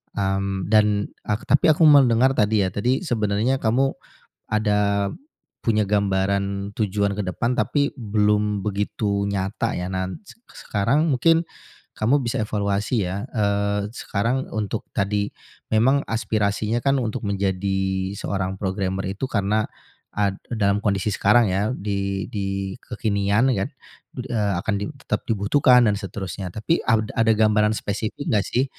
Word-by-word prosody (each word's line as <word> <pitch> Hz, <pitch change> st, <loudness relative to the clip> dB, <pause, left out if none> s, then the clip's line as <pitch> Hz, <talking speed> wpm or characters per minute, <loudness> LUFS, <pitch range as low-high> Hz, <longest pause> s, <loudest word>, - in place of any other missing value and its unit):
Mmm, 95 Hz, 0 st, -1 dB
dan 105 Hz, -1 st, +3 dB, 0.2 s
ak 105 Hz, +1 st, -1 dB
tapi 145 Hz, -, +5 dB
aku 155 Hz, +1 st, +4 dB
mendengar 135 Hz, -4 st, +6 dB
tadi, 105 Hz, -4 st, +2 dB
ya, 95 Hz, -, -1 dB
tadi 125 Hz, -, 0 dB
sebenarnya 115 Hz, -, 0 dB
kamu 130 Hz, +5 st, +2 dB, 0.6 s
ada 105 Hz, -2 st, +1 dB, 0.6 s
punya 110 Hz, -2 st, +2 dB
gambaran 100 Hz, 0 st, 0 dB
tujuan 100 Hz, -1 st, 0 dB
ke 105 Hz, -, -2 dB
depan 110 Hz, +6 st, -1 dB
tapi 145 Hz, -1 st, 0 dB
belum 105 Hz, -2 st, +1 dB
begitu 100 Hz, 0 st, -1 dB
nyata, 100 Hz, +4 st, -2 dB
ya. 90 Hz, -, -3 dB
Nan 95 Hz, 0 st, -3 dB
sek 230 Hz, -, -15 dB, 0.3 s
sekarang 130 Hz, +11 st, +2 dB
mungkin 165 Hz, +6 st, +3 dB, 0.5 s
kamu 130 Hz, +5 st, +1 dB
bisa 115 Hz, 0 st, -1 dB
evaluasi, 105 Hz, +1 st, -1 dB
ya, 100 Hz, +7 st, -4 dB
eee, 100 Hz, -1 st, 0 dB
sekarang 120 Hz, +5 st, -2 dB
untuk 105 Hz, -3 st, -3 dB
tadi 100 Hz, +1 st, 0 dB, 0.4 s
memang 130 Hz, +6 st, +3 dB
aspirasinya, 110 Hz, 0 st, 0 dB
kan, 135 Hz, 0 st, +2 dB
untuk 115 Hz, -4 st, -2 dB
menjadi 95 Hz, -1 st, -1 dB
seorang 95 Hz, -1 st, -2 dB
programmer 95 Hz, 0 st, -2 dB
itu 120 Hz, +7 st, -4 dB
karena 105 Hz, 0 st, 0 dB, 0.5 s
ad 100 Hz, -1 st, 0 dB
dalam 105 Hz, -3 st, +1 dB
kondisi 100 Hz, -1 st, 0 dB
sekarang, 105 Hz, -1 st, +4 dB
ya, 100 Hz, +3 st, 0 dB
di 100 Hz, -1 st, -2 dB
di 95 Hz, -1 st, -3 dB
kekinian, 105 Hz, +2 st, +1 dB
ya, 95 Hz, +4 st, -1 dB
kan, -, -, -17 dB, 0.6 s
eee, 105 Hz, -6 st, 0 dB
akan 110 Hz, -, 0 dB
di -, -, -1 dB, 0.2 s
tetap -, -, -2 dB
dibutuhkan 125 Hz, +4 st, +4 dB
dan 105 Hz, -, +3 dB
seterusnya. 95 Hz, -2 st, -5 dB
Tapi 110 Hz, -, 0 dB
ad 110 Hz, -2 st, +1 dB
ada 115 Hz, 0 st, +3 dB
gambaran 105 Hz, 0 st, +3 dB
spesifik 105 Hz, +7 st, -4 dB
nggak, 105 Hz, -2 st, +2 dB
sih, 130 Hz, +3 st, +1 dB
105 Hz, 140 wpm, -23 LUFS, 100-115 Hz, 0.6 s, mendengar